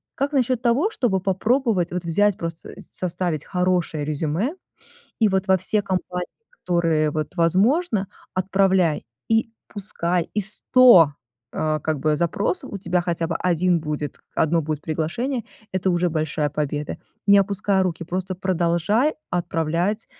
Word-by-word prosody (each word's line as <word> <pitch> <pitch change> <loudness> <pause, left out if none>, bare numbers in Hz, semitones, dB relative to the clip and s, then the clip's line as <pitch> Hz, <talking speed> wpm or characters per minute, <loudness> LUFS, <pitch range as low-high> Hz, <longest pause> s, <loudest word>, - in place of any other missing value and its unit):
Как 280 +2 -1
насчёт 255 -3 +1
того, 260 - +2
чтобы 230 - 0
попробовать 195 0 +1
вот 180 0 -3
взять 205 +4 +2
просто, 165 -1 -6
составить 175 -4 -3
хорошее 180 -4 0
резюме 155 - -1 0.7
и 220 - +5
вот 190 0 0
во 190 - +5
все 205 +3 0
компании, 180 -2 -3 0.2
которые 165 - 0
вот 155 +3 -4
возможно, 200 - +2 0.3
отправляй. 185 -3 +2 0.3
И 225 +1 +2 0.2
пускай 180 -4 -1
из 210 0 +4
100, 235 - +6 0.4
э, 155 -1 -1
как 155 0 -2
бы, 155 +1 +1
запросов 205 - -1
у 200 - -4
тебя 180 -1 0
хотя 170 -1 -1
бы 165 - -1
1 180 0 +1
будет, 150 -1 -4
1 160 +1 +2
будет 150 -1 -4
приглашение- 200 - -2 0.3
это 185 0 0
уже 175 -1 +1
большая 155 -1 -1
победа. 150 0 -3 0.3
Не 200 0 +8
опускай 195 0 +1
руки, 170 -2 -2
просто 185 +2 -3
продолжай 185 - +1 0.2
отправлять, 175 +4 -1
180 Hz, 140 wpm, -22 LUFS, 165-205 Hz, 0.7 s, Не